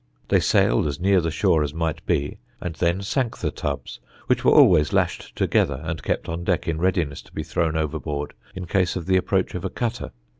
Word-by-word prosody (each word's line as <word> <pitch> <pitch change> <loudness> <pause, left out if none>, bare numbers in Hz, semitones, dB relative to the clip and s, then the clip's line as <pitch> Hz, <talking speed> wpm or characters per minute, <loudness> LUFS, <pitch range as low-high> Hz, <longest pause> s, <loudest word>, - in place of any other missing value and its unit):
They - - +4
sailed - - +3
as 70 +1 -4
near 95 0 +3
the 80 - -1
shore 80 0 +2
as 75 0 -2
might 80 -2 -2
be 70 +1 -1 0.2
and 90 - -4
then 85 +4 0
sank 120 +3 -1
the - - -2
tubs, 70 -3 -5 0.3
which - - +1
were - - +5
always 75 -1 +6
lashed - - -1
together 70 -2 +1
and 80 -2 -4
kept - - -2
on 85 +1 -4
deck 90 0 0
in 80 -1 -1
readiness 85 -5 0
to - - -21
be - - -4
thrown 80 -1 -1
overboard 75 -2 -3 0.2
in 90 -1 -5
case 90 +1 +1
of 85 -3 -4
the 95 +1 +3
approach 95 0 0
of 90 - -5
a 95 - -2
cutter. 120 +3 -3
80 Hz, 215 wpm, -23 LUFS, 75-90 Hz, 0.3 s, always